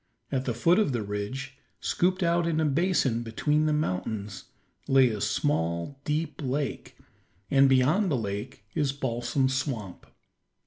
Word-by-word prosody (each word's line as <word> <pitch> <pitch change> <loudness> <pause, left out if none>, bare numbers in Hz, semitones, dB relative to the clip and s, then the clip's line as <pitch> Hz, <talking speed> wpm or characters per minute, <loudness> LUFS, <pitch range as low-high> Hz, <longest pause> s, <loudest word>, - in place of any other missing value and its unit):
At 135 -1 -1
the 120 - -1
foot 170 - +4
of 205 -11 +2
the 115 -3 -1
ridge, 130 +7 -5 0.2
scooped 185 +2 +1
out 170 0 +2
in 160 -2 +1
a 160 - +2
basin 145 -6 +1
between 150 +7 0
the - - +2
mountains, 100 -7 -2 0.4
lay 135 -2 +5
a 105 -3 -4
small, 105 - -1
deep 150 0 -2
lake, 140 0 -3 0.5
and 135 0 +6
beyond 150 +10 +3
the 140 - +1
lake 105 +3 -5
is 140 -2 0
Balsam 130 0 0
Swamp. 130 - -3
135 Hz, 145 wpm, -27 LUFS, 115-150 Hz, 0.5 s, and